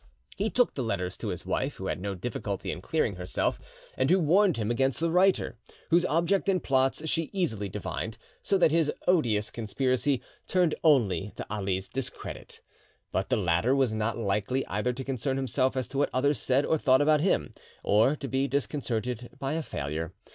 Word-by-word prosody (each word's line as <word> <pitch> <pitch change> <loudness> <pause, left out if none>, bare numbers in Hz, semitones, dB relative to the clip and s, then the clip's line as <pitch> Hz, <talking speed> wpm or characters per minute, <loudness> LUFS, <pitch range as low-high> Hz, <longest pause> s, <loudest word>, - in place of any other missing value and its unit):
He 210 +3 0
took 245 +1 +2
the 135 - -3
letters; 95 -6 -2
to - - -4
his - - -4
wife, - - -1
who - - -7
had - - -2
no 100 0 -3
difficulty 100 -1 -4
in 90 - -6
clearing 110 - 0
herself, 90 0 -1 0.4
and 130 +1 +1
who 185 - +5
warned 180 - +4
him 110 0 -1
against 135 +2 +1
the 165 0 +1
writer, 180 - +2 0.3
whose 170 +2 +4
object 170 +5 +1
and 185 -3 +1
plots 135 +3 +1
she 165 0 0
easily 110 - -1
divined, - - -4 0.2
so 195 - +2
that 175 -4 +4
this 160 -2 +3 0.2
odious 115 - +2
conspiracy 130 +4 0 0.3
turned 180 -4 +2
only 105 - +3
to - - -5
Ali's 95 -2 -2
discredit. 135 -2 -7 0.5
But - - -1
the - - +2
latter 95 +7 +2
was 130 -5 +2
not 110 +1 -1
likely 110 +4 0
either 105 +4 -1
to 130 +2 -5
concern 135 0 -2
himself 130 0 0
as 130 - -1
to 135 - -3
what 145 - +2
others 140 +3 +2
said 135 +3 +2
or 160 - +1
thought 130 -2 +4
about 150 0 +4
him 190 - +1 0.3
or 110 +8 +4
to 140 - -6
be 135 +1 0
disconcerted 125 -4 -2
by 135 +2 -2
a 165 - -1
failure. 80 - -4
130 Hz, 190 wpm, -28 LUFS, 105-155 Hz, 0.5 s, who